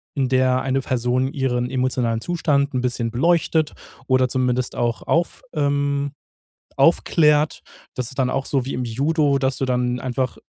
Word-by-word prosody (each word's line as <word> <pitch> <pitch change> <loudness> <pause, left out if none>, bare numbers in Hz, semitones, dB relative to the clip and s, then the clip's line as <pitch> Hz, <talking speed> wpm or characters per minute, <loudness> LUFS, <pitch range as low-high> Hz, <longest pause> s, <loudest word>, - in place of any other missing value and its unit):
in 135 -3 0
der 130 0 +2
eine 135 0 0
Person 130 +1 0
ihren 125 -3 -1
emotionalen 125 -3 0
Zustand 145 -4 0
'n 125 - +1
bisschen 125 -2 -1
beleuchtet 160 +3 +1 0.3
oder 130 -1 +3
zumindest 125 0 0
auch 120 -1 -1
auf 170 +1 0
ähm, 140 -1 0 0.7
aufklärt. 150 -1 +3 0.3
Das 125 - -2
ist 130 - -11
dann 130 -2 +2
auch 135 +1 -1
so 135 -3 0
wie 135 - -3
im 125 - -2
Judo, 140 +4 +1
dass 130 0 0
du - - 0
dann 125 -1 0
einfach 130 0 -2
130 Hz, 160 wpm, -21 LUFS, 125-140 Hz, 0.7 s, oder